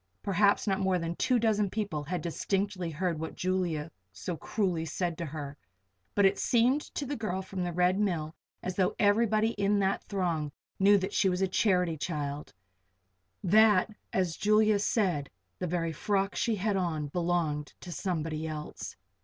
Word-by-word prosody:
Perhaps 200 +1 +3
not 195 -2 +1
more 190 -1 +2
than 170 0 -3
two 250 +6 +2
dozen 215 -3 +2
people 200 -7 -2
had 175 +5 -3
distinctly 190 +1 -1
heard 165 0 -2
what 160 - -5
Julia 175 -4 -1 0.2
so 170 - -5
cruelly 180 0 -1
said 170 +1 -2
to 170 - -3
her; 145 -1 -6 0.6
but 200 - +5
it 195 - +3
seemed 250 +5 +3
to 285 - -2
the 285 +2 -3
girl 190 -5 -2
from 190 -1 -4
the 175 - -2
Red 180 +3 +2
Mill 165 -7 0 0.3
as 185 - -3
though 185 -1 +1
everybody 215 +1 +3
in 200 +1 +3
that 195 0 +1
throng 170 -7 -1 0.3
knew 200 +1 +6
that 190 +1 -3
she 210 -3 +3
was 180 +1 0
a - - +3
charity 180 -4 +2
child 145 -2 -4 0.9
that, 210 +1 +5 0.2
as 180 -4 0
Julia 215 0 +3
said, 180 - +1 0.3
the 180 - -2
very 165 -1 -1
frock 195 +4 0
she 230 -2 +1
had 205 +1 0
on 160 -5 -1
belonged 170 -3 -1
to 180 - -8
somebody 160 -2 -2
else. 155 -1 -6
185 Hz, 170 wpm, -30 LUFS, 165-205 Hz, 0.9 s, knew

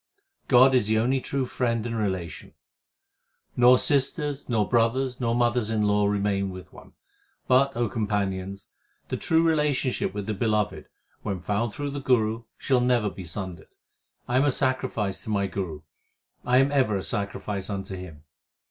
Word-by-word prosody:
God 130 +1 +6
is 125 -5 +3
the 110 0 +2
only 130 +4 +1
true 135 0 -2
friend 115 -2 -1
and 115 -1 -3
relation: 95 -6 -4 1.0
Nor 125 +1 +6
sisters, 145 +1 0
nor 110 -4 +1
brothers, 125 +2 +1
nor 115 -2 0
mothers 120 -2 +1
in 110 -1 0
law 105 0 +2
remain 100 -1 0
with 95 -1 -10
one: - - -15 0.5
But, 130 0 +3
O 120 -1 +1
companions, 100 -3 -3 0.4
the - - -2
true 160 0 +2
relationship 150 -5 +1
with 100 0 -5
the 110 - -2
Beloved, 105 -1 -1 0.3
when 100 -3 -3
found 105 +5 -1
through 145 -1 -4
the 140 0 -5
Guru, 115 -3 +1
shall 130 -3 +1
never 120 -4 +2
be 95 - -9
sundered. 90 -2 -7 0.5
I 120 - +1
am 135 - +4
a 145 - +3
sacrifice 130 -7 -1
to - - -6
my 100 -2 +1
Guru, 90 -5 -4 0.6
I 125 +1 +3
am 135 +2 +4
ever 130 -7 +2
a 95 - -2
sacrifice 100 -1 -3
unto 95 -1 -4
him. 85 -5 -10
110 Hz, 165 wpm, -26 LUFS, 100-130 Hz, 1.0 s, God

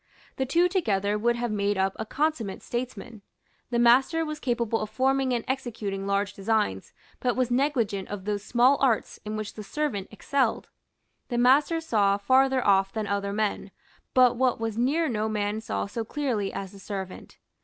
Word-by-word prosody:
The 265 - -1
two 340 +6 +3
together 210 - 0
would 235 +3 +1
have 240 -1 -2
made 205 -1 0
up 190 0 +1
a 220 - -4
consummate 285 -10 -1
statesman. 240 -2 -5 0.5
The 240 - 0
master 260 +8 +4
was 305 -1 -5
capable 235 -4 -1
of 215 - -4
forming 265 +3 +1
and 240 -2 -1
executing 215 -7 -3
large 200 0 0
designs, 200 - -1 0.3
but 245 -2 0
was 255 -1 0
negligent 245 -7 0
of 200 -2 -6
those 205 -1 -2
small 250 +5 +3
arts 250 -5 +1
in 215 +1 -3
which 215 -1 -5
the 215 - -8
servant 205 -3 -2
excelled. 255 +1 -1 0.6
The 240 - -2
master 280 +7 +4
saw 205 -10 +2
farther 260 +4 +3
off 195 -1 +4
than 220 0 -3
other 200 0 -1
men; 210 0 -1 0.5
but 250 -2 +5
what 255 -2 +2
was 225 -1 -2
near 285 +8 +1
no 220 -3 -1
man 210 0 -1
saw 225 0 -2
so 225 +3 -4
clearly 230 -5 -2
as 195 -1 -6
the 200 - -13
servant. 190 -1 -7
225 Hz, 175 wpm, -26 LUFS, 205-260 Hz, 0.6 s, but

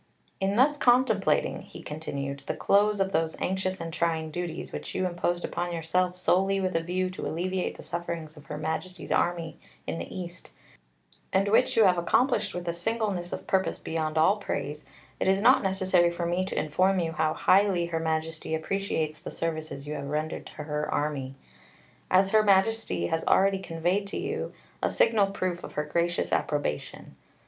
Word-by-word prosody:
"In 195 +1 +1
thus 285 +5 +4
contemplating," 255 0 +3
he - - -12
continued, 140 -2 -4
"the - - -1
close 205 +1 +3
of 195 0 +1
those 160 -2 0
anxious 190 0 -1
and 165 -1 -5
trying 160 -2 0
duties, 175 0 -4
which - - -6
you 185 - +1
imposed 175 0 -1
upon 175 +1 -3
yourself 180 +2 0
solely 190 +2 +2
with 185 -2 -1
a - - +4
view 185 +2 -1
to 185 - -5
alleviate 185 +3 -2
the - - -10
sufferings 170 -2 -5
of 150 -1 -15
Her 150 - -5
Majesty's 160 +4 -4
Army 170 -2 0 0.3
in 165 - -3
the - - -6
East, 175 -1 -7 0.8
and 195 +1 +2
which 220 - +3
you 225 - +7
have 180 -3 +4
accomplished 245 +9 +2
with 175 0 -5
a 170 - 0
singleness 190 -1 -2
of - - -5
purpose 190 0 +1
beyond 160 -1 -2
all 165 +7 +5
praise, 150 -7 -4 0.4
it - - 0
is 190 +1 +4
not - - +6
necessary 185 -2 +3
for 170 0 -3
me 175 +2 0
to 190 - -5
inform 185 +5 +2
you 165 -2 -1
how 160 -1 0
highly 190 -3 +4
Her 165 -1 -2
Majesty 160 0 -2
appreciates 160 -2 -2
the 170 - -7
services 155 -3 -4
you 150 - -4
have 140 -2 -5
rendered 155 +2 -3
to - - -12
Her 150 0 -2
Army; 140 -3 -2 0.7
as 190 +1 +4
Her 220 - +6
Majesty 200 - +2
has 160 - -1
already 195 0 +4
conveyed 180 +3 -1
to - - -4
you - - -3 0.3
a - - +2
signal 215 -3 +3
proof 185 -3 -3
of - - -8
Her 150 - -1
gracious 170 +3 0
approbation. 145 - -2
175 Hz, 180 wpm, -28 LUFS, 160-190 Hz, 0.8 s, you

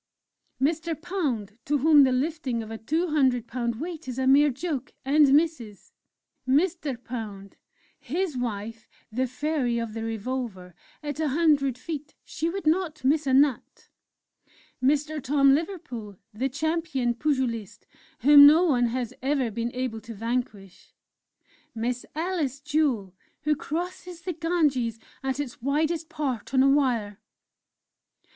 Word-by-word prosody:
"Mr. 320 +3 0
Pound 255 - -3
to 295 - +1
whom 300 +1 +6
the 260 - +2
lifting 260 -3 -1
of 220 - -9
a 225 - -5
two 320 +10 -1
hundred 260 -6 +2
pound 235 -1 -2
weight 330 -1 -6
is 250 -1 -5
a 265 - 0
mere 285 +3 +6
joke, 275 -1 -4
and 290 +2 +5
Mrs. 270 - +1 0.6
"Mr. 300 -1 +1
Pound, 210 -5 -7 0.4
his 330 +3 -2
wife, 225 -2 -4 0.2
the 255 +4 0
'Fairy 255 -2 -1
of 230 -2 -3
the 225 0 -4
Revolver' 225 -5 -4 0.3
at 290 0 -4
100 290 -4 +2
feet 300 +2 -7
she 325 +2 -3
would 380 0 -5
not 310 -2 0
miss 290 +2 +2
a 265 - +2
nut!... 275 -2 +1 0.9
"Mr. 300 +3 +1
Tom 275 0 +4
Liverpool, 260 - -4 0.2
the 255 +6 -1
Champion 295 -3 -1
Pugilist, 240 -6 -2 0.4
whom 285 0 +9
no 315 +4 +6
one 250 -8 +3
has 245 0 -3
ever 265 -3 0
been 235 +2 -3
able 250 -3 -3
to 225 +1 -9
vanquish! 220 -4 -4 0.8
"Miss 240 +2 -3
Alice 315 -5 -2
Jewel, 285 - 0 0.3
who 300 +1 +2
crosses 345 +3 -5
the 360 - -3
Ganges 300 -9 0 0.2
at 270 0 -2
its 265 -6 -5
widest 310 +4 0
part 265 -4 -3
on 260 - +6
a 275 - +5
Wire!"... 240 -7 +1
270 Hz, 140 wpm, -26 LUFS, 235-310 Hz, 0.9 s, whom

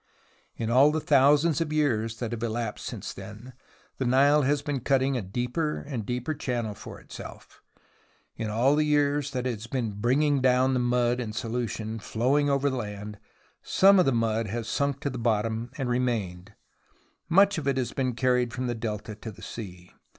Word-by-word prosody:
In 115 0 -3
all 135 +4 +6
the 155 - 0
thousands 150 +3 +4
of 155 -2 -2
years 115 -7 0
that 120 -1 -4
have 115 -1 -4
elapsed 115 -1 -3
since - - -6
then, 105 +6 -10 0.5
the 130 - 0
Nile 140 +4 +5
has 145 +1 +1
been 145 -2 -2
cutting 135 +1 +1
a 125 - -1
deeper 125 - -2
and 130 -8 -5
deeper 125 +5 -2
channel 120 -7 -3
for - - -10
itself. - - -11 0.7
In 110 - -4
all 120 +7 +3
the 155 - +3
years 145 -1 +1
that 130 -2 -3
it 125 - 0
has 110 +1 -8
been 120 -3 -2
bringing 130 +7 +1
down 130 +1 +3
the 125 - +1
mud 120 0 +1
in 110 -3 -4
solution, 115 -1 -3
flowing 130 +7 +1
over 140 0 +2
the 130 -2 -1
land, 105 -2 -6 0.4
some 195 0 +5
of 180 - +4
the - - +4
mud 115 -2 0
has 115 +2 -4
sunk 140 +2 -1
to 140 - -2
the 125 - -5
bottom 115 0 0
and 135 -3 -2
remained; 105 -6 -2 0.7
much 195 +1 +5
of 145 - -5
it 135 -1 +1
has 125 -3 -2
been 130 -3 -1
carried 125 0 +1
from 130 0 -3
the 120 - -1
Delta 110 -1 -4
to 105 +2 -8
the 100 - -14
sea. 90 -5 -8
125 Hz, 190 wpm, -27 LUFS, 115-140 Hz, 0.7 s, all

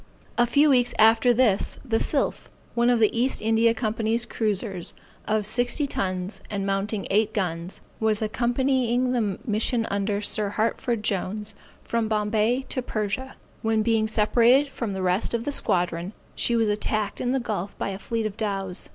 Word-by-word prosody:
_] - - -24 0.3
A 240 0 +3
few 285 +5 +4
weeks 245 -2 +3
after 225 +2 +5
this, 235 -5 +2
the 225 -3 +1
Sylph, 285 - -1 0.2
one 240 0 +2
of 245 -2 +3
the 215 0 +3
East 250 +3 +1
India 225 +1 +3
Company's 225 +1 -1
cruisers, 205 -5 -2 0.3
of 215 -1 +1
sixty 245 +6 +1
tons 185 -6 -3
and 200 -2 -2
mounting 195 +1 -1
eight 215 +2 +2
guns, 175 -2 -2 0.2
was 220 -1 +1
accompanying 245 +2 +1
the 215 -6 0
mission 225 +1 +1
under 200 0 0
Sir 210 0 0
Hartford 225 +1 -1
Jones, 210 +1 -2 0.3
from 230 -1 -1
Bombay, 215 +4 +1
to 255 - -1
Persia; 235 +3 -3 0.3
when 220 -1 +1
being 220 -1 +2
separated 235 +6 +4
from 230 -6 -4
the 190 -1 -3
rest 185 +5 +1
of 230 0 -3
the 290 - -1
squadron, 175 -5 0 0.2
she 235 - 0
was 225 -1 +2
attacked 210 0 -1
in 245 - 0
the 265 - +1
gulf 205 -5 -4
by - - -2
a 195 0 -5
fleet 225 +1 -2
of 210 -2 -3
dows. 195 -4 -2
220 Hz, 170 wpm, -25 LUFS, 205-240 Hz, 0.3 s, after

